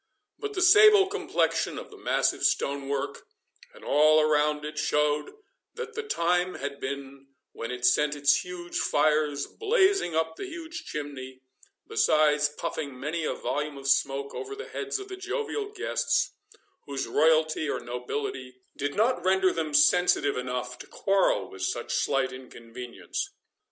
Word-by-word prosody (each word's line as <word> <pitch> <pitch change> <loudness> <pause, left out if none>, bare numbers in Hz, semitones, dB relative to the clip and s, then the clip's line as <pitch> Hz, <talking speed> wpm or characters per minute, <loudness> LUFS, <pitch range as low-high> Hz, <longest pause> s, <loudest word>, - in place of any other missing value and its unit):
But 420 -1 -4
the 365 - +1
sable 415 +2 +8
complexion 405 +2 -1
of - - -8
the - - -12
massive - - +1
stone 140 0 0
work, 140 0 -3 0.4
and - - -15
all 155 +2 +5
around 150 -1 +2
it, 150 0 -5
showed 150 0 +1 0.4
that 455 -1 -6
the 450 - -3
time 180 - 0
had 140 0 -5
been 135 0 -6 0.2
when 115 - -6
it 125 0 -3
sent 150 +4 +3
its 145 0 +4
huge 175 -1 -5
fires 150 -1 +1
blazing 395 - +1
up 160 0 -1
the - - -5
huge 335 -1 -8
chimney, 130 -3 -7 0.4
besides 150 -1 +3
puffing 150 -3 -5
many 155 +4 -3
a - - -1
volume 150 0 -3
of 135 0 -7
smoke 140 0 +1
over 410 0 -6
the 430 - -8
heads 415 0 -3
of 395 -1 -8
the 380 -1 -7
jovial 425 +1 -3
guests, 415 - 0 0.6
whose 140 -1 -3
royalty 155 0 +2
or - - -1
nobility 125 +1 -5 0.2
did 145 0 -3
not 235 +4 +2
render 190 0 +3
them 160 -2 -2
sensitive 145 0 +4
enough 125 0 -4
to - - -10
quarrel 195 - +1
with 95 - -10
such 95 - -2
slight 130 -1 +1
inconvenience. 125 -1 -7
150 Hz, 150 wpm, -27 LUFS, 140-190 Hz, 0.6 s, sable